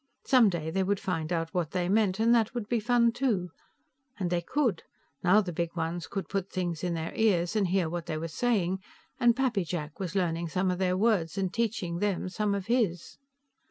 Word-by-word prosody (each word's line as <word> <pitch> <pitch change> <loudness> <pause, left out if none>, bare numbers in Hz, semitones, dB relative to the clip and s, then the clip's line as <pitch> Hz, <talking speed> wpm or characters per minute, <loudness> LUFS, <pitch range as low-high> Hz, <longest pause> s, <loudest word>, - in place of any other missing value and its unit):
Someday 190 - +3
they 190 +3 0
would 195 +1 0
find 165 -3 -3
out 165 -1 -1
what 175 -4 0
they 180 -1 0
meant, 200 0 +2
and 230 +1 +4
that 230 0 +2
would 230 -4 -3
be 240 0 +1
fun, 235 +1 +3
too. 215 -9 -1 0.7
And 180 -4 -2
they 175 -1 +1
could; 255 - 0 0.4
now 190 +4 +5
the 180 -4 -5
Big 170 +1 -2
Ones 165 0 -3
could 195 - -4
put 195 -1 -2
things 175 -3 -3
in 175 -1 0
their 165 0 -4
ears 200 -4 +2
and 205 -3 +2
hear 180 -1 +1
what 170 +1 -4
they 155 - -2
were 165 +1 -3
saying, 190 -1 0 0.4
and 240 -2 +5
Pappy 250 -7 +1
Jack 155 -3 -5
was 185 -1 -4
learning 170 -3 0
some 185 +3 0
of 180 - -3
their 185 -1 +1
words, 200 -5 +1
and 190 -2 -1
teaching 200 -7 -1
them 195 -2 -1
some 205 +1 0
of 195 -2 -4
his. 215 -8 -1
185 Hz, 210 wpm, -29 LUFS, 170-215 Hz, 0.7 s, now